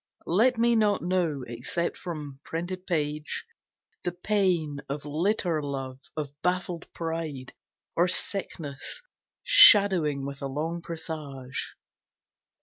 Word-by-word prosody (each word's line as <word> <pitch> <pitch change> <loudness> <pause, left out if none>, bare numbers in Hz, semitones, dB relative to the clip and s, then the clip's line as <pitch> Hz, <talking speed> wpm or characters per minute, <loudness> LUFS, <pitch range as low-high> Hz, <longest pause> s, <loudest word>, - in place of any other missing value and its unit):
Let 230 +8 +3
me 235 +1 +3
not 210 -4 +2
know, 170 -6 0
except 120 +9 -2
from 150 -6 -7
printed 180 +3 -5
page, 150 -3 -2 0.6
The 175 - -1
pain 175 -6 0
of 140 +1 -4
litter 165 +1 0
love, 135 -2 -5 0.2
of 145 -3 -3
baffled 180 -1 -2
pride, 160 -6 -4 0.4
Or 175 +2 +4
sickness 175 - -1 0.4
shadowing 190 - +7
with 140 0 -6
a 140 - -2
long 160 +5 -3
presage. 150 -6 -6
165 Hz, 110 wpm, -27 LUFS, 145-185 Hz, 0.6 s, shadowing